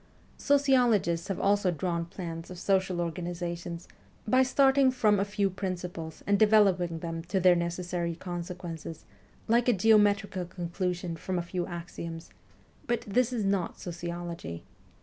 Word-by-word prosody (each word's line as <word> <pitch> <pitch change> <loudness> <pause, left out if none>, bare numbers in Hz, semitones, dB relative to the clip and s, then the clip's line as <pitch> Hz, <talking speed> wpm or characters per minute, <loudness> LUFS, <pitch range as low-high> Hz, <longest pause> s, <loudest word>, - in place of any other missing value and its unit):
Sociologists 245 -12 +3
have 195 - -3
also 200 -1 +2
drawn 170 0 -1
plans 165 -2 -7
of 180 - -8
social 190 -1 +1
organizations, 170 0 -4 0.4
by 255 +4 +5
starting 270 +1 +4
from 215 -5 +3
a - - +3
few 200 0 0
principles 180 -4 -5
and 200 0 +2
developing 195 -6 +4
them 165 0 -4
to 190 +2 0
their 180 -1 +6
necessary 170 0 -2
consequences, 175 -2 -6 0.4
like 235 +2 +3
a - - +5
geometrical 205 -2 +3
conclusion 175 0 -3
from 185 +3 -3
a 175 - -1
few 175 0 -3
axioms; 170 -1 -7 0.6
but 240 -1 0
this 245 +4 +1
is 225 -5 -1
not 195 -3 -1
sociology. 170 - -6
180 Hz, 135 wpm, -29 LUFS, 170-205 Hz, 0.6 s, their